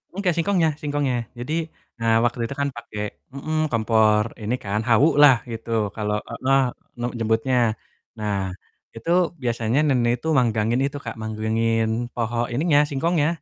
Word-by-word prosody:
Enggak, 190 Hz, -4 st, +1 dB
singkongnya 170 Hz, -1 st, +2 dB
singkongnya 145 Hz, -3 st, 0 dB, 0.2 s
jadi, 125 Hz, +6 st, -4 dB, 0.5 s
eee, 115 Hz, 0 st, +3 dB
waktu 120 Hz, 0 st, 0 dB
itu 140 Hz, -, -6 dB
kan 140 Hz, -, +1 dB
pakai 105 Hz, -3 st, -7 dB, 0.3 s
mhm, 155 Hz, +3 st, -3 dB
kompor 110 Hz, -2 st, +3 dB, 0.2 s
ini 110 Hz, +4 st, -1 dB
kan, 100 Hz, +1 st, -1 dB
hawu 120 Hz, +6 st, +5 dB
lah 145 Hz, -3 st, +9 dB, 0.2 s
gitu 115 Hz, +1 st, -6 dB, 0.2 s
kalau 105 Hz, -1 st, -1 dB
heeh, 130 Hz, +3 st, +2 dB, 0.4 s
nem 120 Hz, +1 st, -1 dB
nyebutnya. 115 Hz, +3 st, +1 dB, 0.6 s
Nah, 105 Hz, -2 st, -1 dB, 0.6 s
itu 115 Hz, +9 st, -3 dB, 0.3 s
biasanya 115 Hz, +2 st, 0 dB
nenek 120 Hz, -4 st, +2 dB
itu 160 Hz, -, -6 dB
manggangin 115 Hz, -1 st, +2 dB
itu 140 Hz, +1 st, -3 dB
Kak, -, -, -5 dB
manggangin 110 Hz, +1 st, 0 dB, 0.3 s
pohon 120 Hz, 0 st, -2 dB, 0.2 s
ininya, 145 Hz, +3 st, +3 dB
singkongnya. 150 Hz, +2 st, +1 dB
120 Hz, 145 wpm, -23 LUFS, 110-140 Hz, 0.6 s, lah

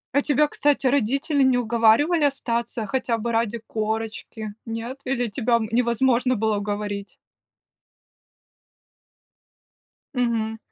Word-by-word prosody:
А 285 Hz, -, +5 dB
тебя, 300 Hz, +1 st, +3 dB
кстати, 290 Hz, -2 st, +1 dB
родители 275 Hz, +3 st, +1 dB
не 260 Hz, -2 st, +4 dB
уговаривали 240 Hz, +8 st, +3 dB
остаться 235 Hz, -4 st, -1 dB
хотя 240 Hz, 0 st, -1 dB
бы 235 Hz, +1 st, -3 dB
ради 230 Hz, 0 st, 0 dB
корочки, 220 Hz, -1 st, -4 dB
нет? 230 Hz, +4 st, -5 dB
Или 245 Hz, -2 st, 0 dB
тебя, 235 Hz, +2 st, 0 dB
м, 220 Hz, -2 st, 0 dB
невозможно 245 Hz, +1 st, +2 dB
было 215 Hz, -1 st, 0 dB
уговорить? 205 Hz, 0 st, -4 dB, 3.0 s
Мгм. 230 Hz, -3 st, -1 dB
235 Hz, 105 wpm, -23 LUFS, 220-260 Hz, 3.0 s, А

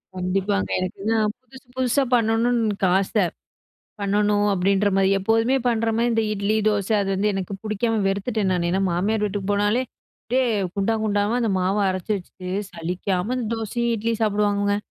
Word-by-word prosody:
கண்டிப்பாங்க. 190 Hz, +2 st, 0 dB
எனக்குதான் 210 Hz, +4 st, -1 dB, 0.2 s
புதுசு, 260 Hz, 0 st, -16 dB
புதுசா 260 Hz, +2 st, +2 dB
பண்ணணுனு 225 Hz, +1 st, +2 dB
எனக்கு 200 Hz, -3 st, 0 dB
ஆச 195 Hz, 0 st, -2 dB, 0.9 s
பண்ணணு 205 Hz, +1 st, +2 dB, 0.2 s
அப்படின்ற 195 Hz, +2 st, +2 dB
மாரி. 195 Hz, 0 st, +3 dB
எப்போதுமே 225 Hz, +6 st, +2 dB
பண்ற 230 Hz, -1 st, +1 dB
மாரி 235 Hz, +1 st, +2 dB
இந்த 225 Hz, -1 st, +1 dB
இட்லி, 200 Hz, +1 st, 0 dB
தோசை 205 Hz, 0 st, +1 dB
அது 195 Hz, -, -2 dB
வந்து 205 Hz, +2 st, +1 dB
எனக்கு 195 Hz, 0 st, -4 dB
புடிக்காம 220 Hz, +1 st, 0 dB
வெறுத்துட்டேன் 200 Hz, +1 st, -1 dB
நானு. 170 Hz, -1 st, 0 dB
ஏன்னா 190 Hz, +2 st, +1 dB
மாமியார் 210 Hz, +5 st, 0 dB
வீட்டுக்கு 205 Hz, -1 st, -3 dB
போனாலே 205 Hz, +4 st, +2 dB, 0.4 s
அப்படியே 255 Hz, +2 st, +1 dB, 0.3 s
குண்டா 200 Hz, +3 st, +1 dB
குண்டாவா 205 Hz, 0 st, +1 dB
அந்த 230 Hz, -3 st, 0 dB
மாவ 185 Hz, +2 st, +1 dB
அரைச்சு 185 Hz, +2 st, -3 dB
வச்சுட்டு, 185 Hz, 0 st, -11 dB, 0.2 s
சலிக்காம 180 Hz, +4 st, -2 dB
அந்த 250 Hz, -, -2 dB
தோசையும், 235 Hz, +2 st, -2 dB
இட்லியும் 225 Hz, +1 st, -2 dB
சாப்பிடுவாங்கங்க. 205 Hz, -1 st, +1 dB
205 Hz, 155 wpm, -23 LUFS, 195-225 Hz, 0.9 s, மாரி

